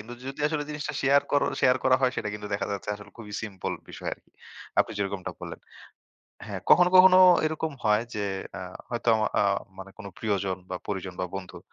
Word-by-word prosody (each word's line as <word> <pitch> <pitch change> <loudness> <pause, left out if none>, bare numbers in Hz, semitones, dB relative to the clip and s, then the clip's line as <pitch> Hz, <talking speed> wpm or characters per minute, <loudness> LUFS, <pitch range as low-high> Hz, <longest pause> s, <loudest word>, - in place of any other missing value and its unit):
কিন্তু 120 +3 -9 0.2
যদি 135 +2 -7
আসলে 150 -2 -2
জিনিসটা 150 0 -4
শেয়ার 140 +1 +5
করো, 145 - +3
শেয়ার 130 0 +5
করা 130 0 +5
হয় 130 -1 +3
সেটা 105 - -2
কিন্তু 105 0 -7
দেখা 100 - -2
যাচ্ছে 100 0 -6
আসলে 105 - -13
খুবই 105 -2 -9
সিম্পল 100 -4 -4 0.2
বিষয় - - -5
আরকি। - - -31 0.5
আপনি 115 - -1
যেরকমটা 100 -2 -3
বললেন। - - -7 0.9
হ্যাঁ, - - -6
কখনো, 180 0 +7
কখনো 185 0 +8 0.3
এরকম 155 0 -1
হয় 105 +2 +3
যে, 105 - -1 0.3
আ - - -7 0.3
হয়তো 120 0 -4
আমা 110 0 +1
আ - - +4 0.4
মানে 95 0 -9
কোনো 100 -2 -7
প্রিয়জন 100 -4 -1
বা 90 - -3
পরিজন 95 -2 -4
বা - - 0
বন্ধু 95 -2 -7
110 Hz, 195 wpm, -27 LUFS, 100-140 Hz, 0.9 s, কখনো